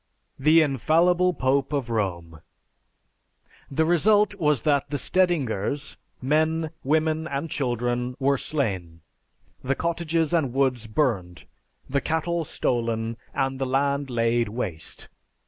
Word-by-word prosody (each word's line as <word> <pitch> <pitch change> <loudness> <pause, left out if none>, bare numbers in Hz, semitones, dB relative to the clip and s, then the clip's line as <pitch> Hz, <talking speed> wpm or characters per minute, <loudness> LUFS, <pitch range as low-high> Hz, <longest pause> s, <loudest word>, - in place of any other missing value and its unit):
The 155 +4 +5
infallible 170 +6 +3
pope 135 -3 0
of 135 -5 -2
Rome! 85 -7 -3 1.3
The 160 +3 +1
result 205 +6 +4
was 150 -5 +2
that 145 -2 +1
the 145 - -2
Stedingers, 145 - 0 0.2
men, 155 +3 +1
women, 155 +2 +1
and 140 +3 -4
children, 125 -1 -1
were 140 0 +2
slain, 95 - -2 0.6
the 135 +2 0
cottages 165 0 -1
and 145 -8 +1
woods 130 -4 +1
burned, 95 - -1 0.4
the 140 +1 0
cattle 165 +1 -1
stolen 115 -3 -1 0.2
and 135 0 -1
the 135 - -1
land 140 +1 0
laid 115 -1 +1
waste. 95 -9 -5
140 Hz, 115 wpm, -25 LUFS, 120-160 Hz, 1.3 s, The